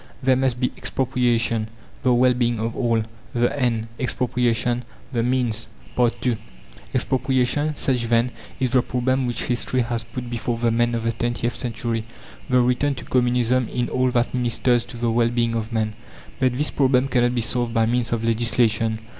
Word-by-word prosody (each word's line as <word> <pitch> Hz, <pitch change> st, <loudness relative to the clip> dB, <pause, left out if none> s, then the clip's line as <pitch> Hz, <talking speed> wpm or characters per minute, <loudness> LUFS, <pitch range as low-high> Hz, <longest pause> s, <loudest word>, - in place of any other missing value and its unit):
There 130 Hz, 0 st, +4 dB
must 130 Hz, -2 st, 0 dB
be 125 Hz, -, +1 dB
EXPROPRIATION. 120 Hz, -4 st, 0 dB, 0.3 s
The 130 Hz, -, +3 dB
well 125 Hz, +1 st, +5 dB
being 120 Hz, -2 st, 0 dB
of 115 Hz, +1 st, -2 dB
all 115 Hz, -3 st, +1 dB, 0.3 s
the 120 Hz, 0 st, +2 dB
end; 115 Hz, -3 st, 0 dB
expropriation 125 Hz, -1 st, 0 dB, 0.3 s
the 120 Hz, -3 st, 0 dB
means. 120 Hz, -2 st, 0 dB, 0.6 s
II 120 Hz, -4 st, +1 dB, 0.5 s
Expropriation, 135 Hz, +3 st, +1 dB
such 125 Hz, -4 st, 0 dB
then 115 Hz, +1 st, +2 dB, 0.3 s
is 130 Hz, -2 st, 0 dB
the 130 Hz, -1 st, +4 dB
problem 130 Hz, +1 st, 0 dB
which 120 Hz, -, -1 dB
History 125 Hz, +1 st, 0 dB
has 120 Hz, -1 st, -2 dB
put 120 Hz, +2 st, -7 dB
before 120 Hz, 0 st, -2 dB
the 115 Hz, 0 st, +1 dB
men 120 Hz, +1 st, +2 dB
of 115 Hz, -, -2 dB
the 115 Hz, -, +1 dB
twentieth 120 Hz, +1 st, -2 dB
century: 115 Hz, -1 st, -3 dB, 0.4 s
the 125 Hz, -1 st, +4 dB
return 125 Hz, +3 st, +1 dB
to -, -, -8 dB
Communism 125 Hz, -1 st, +2 dB
in 120 Hz, -1 st, -1 dB
all 130 Hz, 0 st, +1 dB
that 120 Hz, -1 st, 0 dB
ministers 120 Hz, -1 st, +1 dB
to -, -, -9 dB
the 115 Hz, -1 st, 0 dB
well 115 Hz, 0 st, +3 dB
being 120 Hz, -1 st, 0 dB
of 115 Hz, 0 st, -3 dB
man. 110 Hz, -1 st, 0 dB, 0.5 s
But 130 Hz, -1 st, +2 dB
this 150 Hz, +2 st, +1 dB
problem 130 Hz, -1 st, +3 dB
cannot 120 Hz, -1 st, +2 dB
be 120 Hz, -, +1 dB
solved 120 Hz, +1 st, -1 dB
by 115 Hz, -1 st, +4 dB
means 120 Hz, 0 st, 0 dB
of 115 Hz, -1 st, -1 dB
legislation. 115 Hz, -1 st, +2 dB
120 Hz, 175 wpm, -23 LUFS, 115-125 Hz, 0.6 s, well